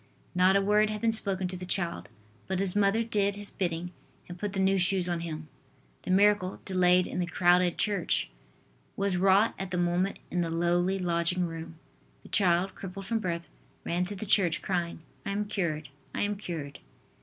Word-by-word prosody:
Not 185 +2 +4
a 200 - +4
word 210 +1 +3
had 215 0 -3
been 230 0 +2
spoken 195 -4 +4
to 185 - -5
the 180 - -7
child, 180 -2 -2 0.4
but 190 - -1
his 195 -1 -1
mother 205 +2 +3
did 205 -3 0
his 205 0 -3
bidding, 175 -2 -3 0.4
and 175 0 -9
put 205 0 -3
the 195 - -2
new 190 0 +3
shoes 180 0 +2
on 175 -1 -1
him. 155 -2 -6 0.5
The - - -9
miracle, 195 0 +3
delayed 180 -1 +3
in - - -4
the 175 - 0
crowded 175 0 +3
church, 200 -5 0 0.7
was 200 -1 +1
wrought 195 +4 +4
at 195 -1 -4
the 180 - -2
moment 175 +2 0
in 180 - 0
the 170 - -1
lowly 175 +3 +1
lodging 175 0 0
room. 165 0 -7 0.5
The - - -14
child, 185 -1 +2
crippled 195 0 -8
from 225 +2 -1
birth, 170 -5 -3 0.4
ran 175 +1 0
to 205 +3 -6
the 200 - -6
church, 185 -4 +2
crying: 170 -3 -2 0.2
"I - - -4
am 210 +1 -1
cured, 160 -8 -2 0.3
I - - -1
am 205 0 0
cured." 165 -8 -6
185 Hz, 190 wpm, -29 LUFS, 175-200 Hz, 0.7 s, Not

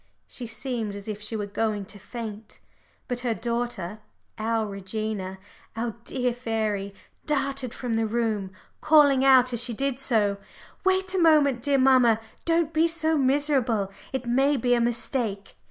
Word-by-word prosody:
She 245 - -7
seemed 225 -2 -4
as 200 +1 -8
if 210 -1 -5
she 215 +2 -4
were 210 -2 -2
going 205 0 -2
to 205 0 -11
faint. 220 -1 -8 0.5
But 245 -2 -2
her 245 -2 -1
daughter, 235 -5 -3 0.4
our 225 0 0
Regina, 195 -1 -4 0.4
our 230 +1 -2
dear 250 -2 -1
fairy, 215 -4 -2 0.3
darted 275 -4 -1
from 245 -1 -4
the 225 0 +1
room, 215 -4 -1 0.3
calling 290 -4 +5
out 255 -2 +6
as 235 0 +1
she 245 -1 -2
did 275 +1 -1
so 215 -7 +1 0.5
"Wait 375 0 +2
a 380 - +1
moment, 295 -7 +4
dear 280 +1 +2
mamma. 255 -4 +5 0.3
Don't 330 -1 +2
be 320 +1 +4
so 320 -1 +1
miserable. 265 -7 +1 0.2
It 265 -2 -3
may 270 +4 +2
be 245 0 +2
a 240 - +3
mistake." 235 -3 -2
240 Hz, 155 wpm, -26 LUFS, 215-270 Hz, 0.5 s, out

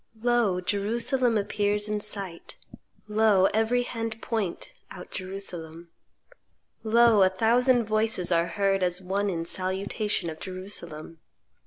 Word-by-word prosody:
"Lo! 240 -7 +2
Jerusalem 230 +5 0
appears 205 0 0
in 210 0 -1
sight. 200 -5 -6 0.5
Lo! 210 -3 +4
every 225 +3 +2
hand 225 -2 -4
point, 220 - -3 0.2
out - - -10
Jerusalem. 175 -4 -6 0.9
Lo! 225 -1 +5
a 190 - +6
thousand 240 +5 +3
voices 215 -4 +1
are 170 0 +3
heard 195 +2 0
as 180 0 +2
one 195 +2 -1
in 165 -3 -3
salutation 190 +2 -1
of 155 - -10
Jerusalem. 175 -4 -8
205 Hz, 120 wpm, -27 LUFS, 185-225 Hz, 0.9 s, a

